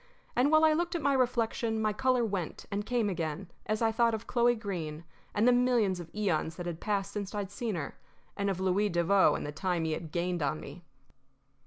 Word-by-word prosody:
And 255 Hz, +3 st, +4 dB
while 310 Hz, 0 st, +6 dB
I 310 Hz, -, +5 dB
looked 345 Hz, +2 st, -1 dB
at 335 Hz, -, -1 dB
my 280 Hz, 0 st, +3 dB
reflection 235 Hz, -3 st, +1 dB
my 215 Hz, -1 st, +1 dB
color 255 Hz, +1 st, +2 dB
went 195 Hz, -6 st, -4 dB
and 200 Hz, +1 st, -1 dB
came 240 Hz, -4 st, +1 dB
again 170 Hz, -1 st, -3 dB, 0.2 s
as 215 Hz, +2 st, 0 dB
I 225 Hz, -, +3 dB
thought 230 Hz, 0 st, +2 dB
of 220 Hz, -, -7 dB
Chloe 240 Hz, 0 st, +3 dB
Greene 170 Hz, -8 st, -5 dB, 0.3 s
and 215 Hz, +3 st, +3 dB
the -, -, +7 dB
millions 245 Hz, -7 st, +3 dB
of 170 Hz, -1 st, -8 dB
eons 170 Hz, -6 st, 0 dB
that 175 Hz, -, -6 dB
had 170 Hz, -2 st, -4 dB
passed 200 Hz, -2 st, -1 dB
since 205 Hz, 0 st, -5 dB
I'd 200 Hz, -2 st, -3 dB
seen 220 Hz, 0 st, -3 dB
her, 150 Hz, -4 st, -5 dB, 0.4 s
and 200 Hz, -1 st, 0 dB
of 190 Hz, -2 st, -2 dB
Louis 190 Hz, +2 st, +2 dB
Devoe 175 Hz, +3 st, +4 dB
and -, -, -4 dB
the 145 Hz, -, -4 dB
time 175 Hz, +1 st, -1 dB
he 160 Hz, -, -1 dB
had 155 Hz, 0 st, -4 dB
gained 175 Hz, 0 st, -1 dB
on 145 Hz, +2 st, 0 dB
me. 175 Hz, -, -10 dB
200 Hz, 220 wpm, -30 LUFS, 175-235 Hz, 0.4 s, the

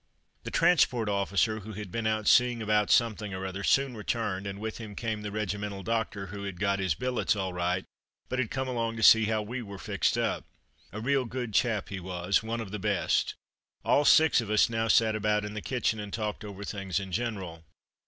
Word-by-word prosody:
The -, -, -3 dB
transport 150 Hz, -9 st, +3 dB
officer, 100 Hz, +2 st, +1 dB
who 110 Hz, +1 st, -9 dB
had 105 Hz, -2 st, -7 dB
been 115 Hz, +1 st, -1 dB
out 110 Hz, -1 st, -1 dB
seeing 125 Hz, -1 st, +5 dB
about 105 Hz, -1 st, +1 dB
something 110 Hz, -4 st, +2 dB
or 95 Hz, 0 st, -4 dB
other, 95 Hz, +1 st, -5 dB
soon 135 Hz, +1 st, +2 dB
returned, 105 Hz, -3 st, -2 dB
and 100 Hz, 0 st, -5 dB
with 110 Hz, +1 st, -5 dB
him 110 Hz, -3 st, -8 dB
came 110 Hz, -1 st, -3 dB
the 105 Hz, -1 st, -5 dB
regimental 105 Hz, -1 st, -3 dB
doctor, 110 Hz, -3 st, -2 dB
who 100 Hz, -1 st, -6 dB
had 100 Hz, -3 st, -6 dB
got 100 Hz, -1 st, +1 dB
his 95 Hz, -5 st, 0 dB
billets 125 Hz, 0 st, 0 dB
all 95 Hz, -2 st, -3 dB
right, 90 Hz, +1 st, -1 dB, 0.4 s
but 130 Hz, -, -2 dB
had 120 Hz, -4 st, 0 dB
come 130 Hz, 0 st, -2 dB
along 115 Hz, -2 st, -2 dB
to 115 Hz, -, -2 dB
see 110 Hz, 0 st, +8 dB
how 110 Hz, 0 st, 0 dB
we 120 Hz, +4 st, -5 dB
were 100 Hz, -3 st, -8 dB
fixed -, -, 0 dB
up. -, -, -1 dB, 0.5 s
A 105 Hz, -, -6 dB
real 135 Hz, +3 st, +1 dB
good 120 Hz, -2 st, -5 dB
chap 110 Hz, -2 st, +1 dB
he 100 Hz, -, -5 dB
was, 90 Hz, +1 st, 0 dB
one 115 Hz, +1 st, -3 dB
of 100 Hz, -4 st, -7 dB
the 105 Hz, -, -4 dB
best. 100 Hz, -2 st, 0 dB, 0.5 s
All 145 Hz, -, +4 dB
six 155 Hz, -3 st, +6 dB
of 110 Hz, -, -7 dB
us 110 Hz, +2 st, +3 dB
now 115 Hz, 0 st, 0 dB
sat 110 Hz, 0 st, +4 dB
about 105 Hz, 0 st, +1 dB
in 105 Hz, -, -6 dB
the 105 Hz, -, -5 dB
kitchen 120 Hz, -3 st, -1 dB
and 105 Hz, -1 st, -6 dB
talked 105 Hz, 0 st, -3 dB
over 100 Hz, -1 st, -7 dB
things 100 Hz, -2 st, -3 dB
in 95 Hz, -1 st, -7 dB
general. 95 Hz, -6 st, -3 dB
105 Hz, 215 wpm, -29 LUFS, 100-115 Hz, 0.5 s, see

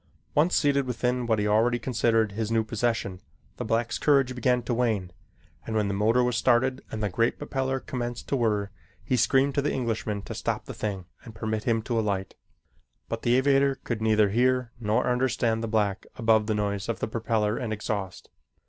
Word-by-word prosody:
Once 160 Hz, +5 st, +3 dB
seated 140 Hz, -2 st, +2 dB
within 125 Hz, 0 st, -1 dB
what 110 Hz, -2 st, +2 dB
he 105 Hz, 0 st, 0 dB
already 115 Hz, +3 st, +3 dB
considered 115 Hz, -3 st, +1 dB
his 110 Hz, +1 st, -3 dB
new 115 Hz, -1 st, +2 dB
possession, 110 Hz, -4 st, -2 dB, 0.4 s
the -, -, -3 dB
black's 115 Hz, +1 st, -1 dB
courage 135 Hz, -4 st, +3 dB
began 125 Hz, 0 st, +1 dB
to 120 Hz, -, -2 dB
wane 110 Hz, -7 st, 0 dB, 0.5 s
and 110 Hz, -, -4 dB
when 105 Hz, -2 st, +1 dB
the 100 Hz, -, -1 dB
motor 110 Hz, +5 st, +3 dB
was 125 Hz, -1 st, 0 dB
started 130 Hz, +3 st, +2 dB
and 110 Hz, -1 st, -4 dB
the 105 Hz, -, +1 dB
great 115 Hz, +6 st, +1 dB
propeller 135 Hz, -2 st, -2 dB
commenced 120 Hz, -2 st, -5 dB
to -, -, 0 dB
whir, 105 Hz, -5 st, 0 dB, 0.3 s
he 130 Hz, -, 0 dB
screamed 135 Hz, +3 st, +3 dB
to 140 Hz, -, +1 dB
the 150 Hz, -, 0 dB
Englishman 110 Hz, -4 st, -2 dB
to -, -, -6 dB
stop -, -, -3 dB
the -, -, -7 dB
thing 100 Hz, -4 st, -4 dB, 0.2 s
and 115 Hz, -3 st, -11 dB
permit 110 Hz, 0 st, -3 dB
him 115 Hz, -2 st, +1 dB
to 115 Hz, 0 st, -1 dB
alight, 100 Hz, -3 st, -2 dB, 0.8 s
but -, -, -3 dB
the 120 Hz, +1 st, +2 dB
aviator 135 Hz, +1 st, +3 dB
could 115 Hz, -2 st, -3 dB
neither 110 Hz, -2 st, +3 dB
hear 125 Hz, +2 st, +1 dB
nor 110 Hz, -1 st, +1 dB
understand 125 Hz, -2 st, +1 dB
the -, -, -1 dB
black 105 Hz, -2 st, 0 dB
above 110 Hz, -2 st, +3 dB
the 110 Hz, -, +1 dB
noise 100 Hz, 0 st, -2 dB
of 115 Hz, -, -2 dB
the -, -, -1 dB
propeller 110 Hz, -1 st, 0 dB
and 115 Hz, -3 st, -3 dB
exhaust. 100 Hz, -3 st, -4 dB
115 Hz, 195 wpm, -27 LUFS, 105-125 Hz, 0.8 s, Once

